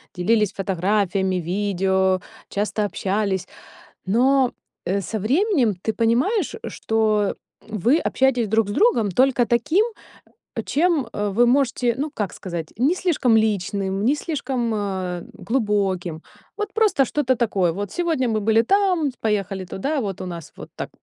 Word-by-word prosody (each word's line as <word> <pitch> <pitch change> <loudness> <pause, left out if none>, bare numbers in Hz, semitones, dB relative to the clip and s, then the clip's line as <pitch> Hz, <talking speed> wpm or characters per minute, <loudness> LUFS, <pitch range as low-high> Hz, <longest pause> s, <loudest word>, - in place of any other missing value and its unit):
делились 210 +3 +2
фотографиями, 190 0 0
видео, 190 +1 +1 0.3
часто 210 +1 -1
общались. 195 -1 -1 0.6
Но, 255 +5 +3 0.3
э, 195 +2 0
со 215 +5 -4
временем, 265 - +2
ты 220 - -1
понимаешь, 270 - +1
что 215 -2 0 0.3
вы 225 - +2
общаетесь 260 -7 +1
друг 220 0 +2
с - - -2
другом 230 - +3
только 250 +4 +3
таким, 295 - +2 0.8
чем 315 -4 +1
вы 205 +3 +2
можете, 245 -2 +2
ну, 295 +3 -2
как 205 -9 -2
сказать, 170 -4 -6
не 275 +9 +2
слишком 300 -11 +2
личным, 200 -2 0
не 275 +5 +3
слишком, 265 -7 -2
э, 190 -4 -3
глубоким. 195 -8 -1 0.4
Вот 420 -1 -4
просто 425 -10 +3
что-то 260 -1 0
такое. 195 -8 +1
Вот 200 +2 -4
сегодня 325 -8 0
мы 220 -1 +1
были 220 +2 +3
там, 360 - +2
поехали 195 -3 -1
туда, 275 - -2
вот 200 -6 -4
у - - -4
нас 170 -3 -8
вот - - -10
так - - -5
220 Hz, 135 wpm, -22 LUFS, 195-265 Hz, 0.8 s, Но